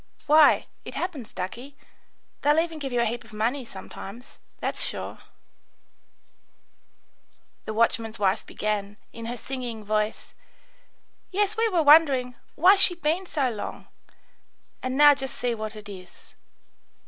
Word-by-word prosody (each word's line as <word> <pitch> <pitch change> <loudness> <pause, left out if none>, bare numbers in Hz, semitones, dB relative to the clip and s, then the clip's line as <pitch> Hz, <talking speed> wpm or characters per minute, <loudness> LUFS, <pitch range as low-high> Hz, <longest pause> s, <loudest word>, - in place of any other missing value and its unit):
Why, 305 0 +6 0.2
it - - -8
happens, 295 - -4
ducky, 245 +10 -7 0.6
they'll 295 +1 +3
even 325 -1 -2
give 275 -3 -4
you 240 -1 +1
a - - +2
heap 240 +2 -3
of 225 -1 -17
money 235 +6 -1
sometimes, 215 +4 -10 0.2
that's - - -1
sure," - - -4 2.5
the 215 - -4
watchman's 230 0 +1
wife 195 0 +1
began, 210 -1 -3 0.2
in 230 0 -7
her 240 +1 -4
singing 245 -3 -5
voice: 215 +1 -2 1.0
"Yes, 400 +1 0
we 455 0 +2
were 350 -5 +2
wondering, 280 -5 +5 0.2
'Why's 380 +5 +6
she 355 -3 +4 0.3
so 275 -7 0
long?' 215 - -7 0.9
And 255 +1 -3
now 295 0 +8
just 265 -2 -5
see 245 -1 -1
what 220 -1 -5
it 210 -1 -9
is. 185 -3 -12
245 Hz, 135 wpm, -26 LUFS, 215-295 Hz, 2.5 s, now